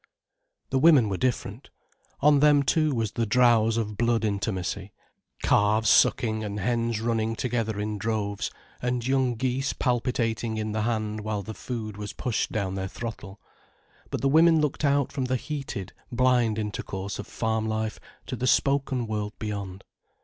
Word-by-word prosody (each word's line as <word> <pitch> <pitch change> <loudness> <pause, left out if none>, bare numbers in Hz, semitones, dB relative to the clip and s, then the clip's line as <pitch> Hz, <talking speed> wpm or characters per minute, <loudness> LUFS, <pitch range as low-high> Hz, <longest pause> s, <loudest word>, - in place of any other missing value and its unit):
The 130 - +2
women 135 -8 +6
were 95 - -2
different. 120 -1 -2 0.5
On 145 0 +5
them 145 -1 +5
too 155 0 +2
was 110 -3 -1
the 115 -1 -1
drowse 115 -1 +4
of 105 -2 -2
blood 115 -1 +1
intimacy, 100 -1 -2 0.5
calves 105 +1 +3
sucking 110 -2 +3
and 105 0 -4
hens 115 +1 0
running 115 -1 0
together 115 -3 -2
in 105 0 -3
droves, 105 -2 -2 0.3
and 125 -1 -1
young 130 -2 +1
geese 130 +3 -1
palpitating 120 -3 -1
in 110 0 -2
the 110 0 -1
hand 110 -1 -1
while 105 -1 -3
the 110 +3 -6
food 110 -3 -6
was 105 0 -6
pushed 120 -4 -2
down 100 -3 -2
their 95 0 -3
throttle. 105 -2 -7 0.7
But - - -3
the 135 - +2
women 160 +3 +5
looked 150 0 -1
out 140 -2 +2
from 135 -3 -2
the 130 0 0
heated, 135 - -5 0.2
blind 120 -3 +2
intercourse 100 -2 -4
of - - -6
farm 110 -1 -1
life, 110 0 -2 0.3
to 130 - -4
the 125 +1 -2
spoken 135 -1 +2
world 105 -1 -3
beyond. 100 -3 -5
115 Hz, 160 wpm, -26 LUFS, 105-125 Hz, 0.7 s, women